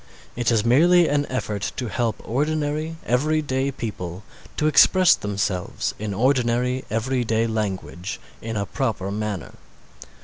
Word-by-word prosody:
It 120 -1 0
is 115 -2 +2
merely 170 +8 +5
an 145 -1 +1
effort 105 -5 -3
to 125 - -3
help 115 0 -2
ordinary, 150 +4 -1
everyday 140 +1 +1
people 100 -7 -6 0.3
to 150 - +1
express 175 +4 +6
themselves 100 - -2
in 105 -1 -3
ordinary, 125 +2 +1
everyday 115 -1 0
language, 105 -4 -3 0.2
in 115 -1 -4
a 100 - -1
proper 100 -3 -2
manner. 105 -4 -4
120 Hz, 125 wpm, -23 LUFS, 105-140 Hz, 0.3 s, express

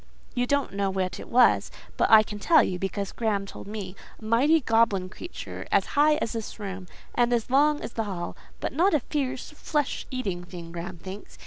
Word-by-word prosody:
You 245 -1 0
don't 285 -4 0
know 200 0 0
what 185 -2 -2
it - - -9
was; 245 +1 +4 0.3
but - - +2
I 220 -1 +9
can 210 -1 -7
tell 315 +2 +5
you, 180 -1 -2
because 195 +1 -3
Graham 210 -4 -1
told 195 - -10
me. 200 -3 -6 0.2
A 220 - -11
mighty, 270 +9 +4
goblin 225 -7 +2
creature, 345 - -8
as - - +4
high 300 +1 +5
as 300 -7 -2
this 225 -2 -5
room, 195 -3 -6 0.3
and 240 0 +2
as 240 0 0
long 295 +2 +4
as - - -6
the 225 - -2
hall; 180 -4 -4 0.2
but - - -3
not 340 +4 +3
a 295 - +2
fierce, 265 -1 -3
flesh 300 -1 -2
eating 200 -10 -3
thing, 175 -2 -9
Graham 175 +1 -6
thinks. 190 +4 -9
220 Hz, 205 wpm, -26 LUFS, 195-270 Hz, 0.3 s, I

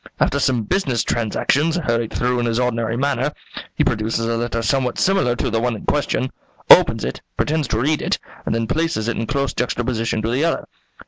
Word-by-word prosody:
After 140 - +2
some 125 -5 +1
business 135 - 0
transactions, 140 +8 +1
hurried 115 -9 -1
through 125 0 0
in 120 - 0
his 115 +1 0
ordinary 115 -2 0
manner, 140 +1 0 0.4
he - - +2
produces 115 +1 0
a 115 0 0
letter 115 0 -2
somewhat 130 0 0
similar 190 -11 +2
to 120 - -2
the 115 - +1
one 120 0 0
in - - -9
question, 130 -3 0 0.4
opens - - +7
it, 65 - -5 0.2
pretends 155 -2 0
to 110 - -1
read 150 +5 +1
it, - - 0 0.3
and - - -1
then 115 0 0
places 155 -4 -1
it 120 - -1
in 115 - -3
close 140 -2 -1
juxtaposition 115 -2 -1
to 115 - -1
the 130 +5 +1
other. 165 - 0
120 Hz, 200 wpm, -20 LUFS, 115-140 Hz, 0.4 s, opens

